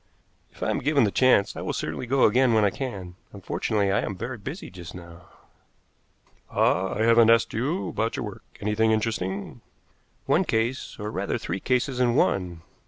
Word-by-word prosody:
"If -, -, -9 dB
I -, -, +1 dB
am -, -, -1 dB
given 140 Hz, -1 st, +2 dB
the 105 Hz, -, +2 dB
chance, 130 Hz, -5 st, +3 dB
I -, -, -5 dB
will -, -, -3 dB
certainly 125 Hz, -, -4 dB
go 135 Hz, +2 st, +2 dB
again 120 Hz, +2 st, +4 dB
when 110 Hz, -1 st, +4 dB
I 100 Hz, -, +2 dB
can. 95 Hz, -9 st, -6 dB, 0.2 s
Unfortunately, 100 Hz, +1 st, -1 dB
I 100 Hz, -, +2 dB
am 100 Hz, -, -3 dB
very 115 Hz, +5 st, -5 dB
busy 155 Hz, -, -7 dB
just 90 Hz, -1 st, -10 dB
now." 85 Hz, +1 st, -12 dB, 1.2 s
"Ah, 95 Hz, +2 st, +1 dB
I 110 Hz, -, 0 dB
haven't 115 Hz, 0 st, +6 dB
asked 115 Hz, 0 st, +4 dB
you 145 Hz, +11 st, -1 dB
about 115 Hz, +4 st, -2 dB
your 130 Hz, -, -3 dB
work. 105 Hz, -, -9 dB, 0.2 s
Anything 105 Hz, +2 st, +1 dB
interesting?" 105 Hz, -3 st, -2 dB, 0.6 s
"One -, -, +3 dB
case, 115 Hz, +4 st, -1 dB
or, 105 Hz, +1 st, -5 dB
rather, -, -, -2 dB
three 95 Hz, -, -4 dB
cases 125 Hz, +3 st, 0 dB
in 120 Hz, -2 st, +2 dB
one." 90 Hz, -4 st, 0 dB
110 Hz, 180 wpm, -25 LUFS, 95-125 Hz, 1.2 s, haven't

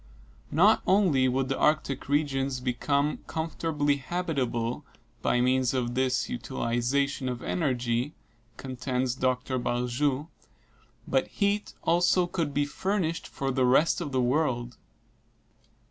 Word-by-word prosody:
Not 200 Hz, +8 st, +5 dB
only 175 Hz, -10 st, +4 dB
would 130 Hz, +1 st, 0 dB
the -, -, -2 dB
Arctic 150 Hz, -3 st, +1 dB
regions 140 Hz, -3 st, 0 dB
become 140 Hz, +4 st, 0 dB
comfortably 155 Hz, -2 st, -1 dB
habitable 135 Hz, -5 st, -2 dB, 0.4 s
by 125 Hz, -, +2 dB
means 130 Hz, 0 st, +2 dB
of 120 Hz, -2 st, -1 dB
this 130 Hz, 0 st, +1 dB
utilization 125 Hz, +3 st, -1 dB
of 125 Hz, -1 st, -5 dB
energy, 125 Hz, -3 st, -1 dB, 0.4 s
contends 130 Hz, -1 st, -2 dB
Dr. 130 Hz, 0 st, -1 dB
Barjou, 125 Hz, +4 st, 0 dB, 0.8 s
but 135 Hz, -1 st, +1 dB
heat 205 Hz, +1 st, -1 dB
also 175 Hz, +1 st, +3 dB
could 170 Hz, -4 st, -2 dB
be 145 Hz, +1 st, +1 dB
furnished 170 Hz, +1 st, -2 dB
for 135 Hz, -1 st, -3 dB
the 130 Hz, 0 st, +1 dB
rest 150 Hz, +7 st, +3 dB
of 150 Hz, -4 st, -4 dB
the 130 Hz, -1 st, +1 dB
world. 125 Hz, -3 st, 0 dB
135 Hz, 115 wpm, -28 LUFS, 125-155 Hz, 0.8 s, Not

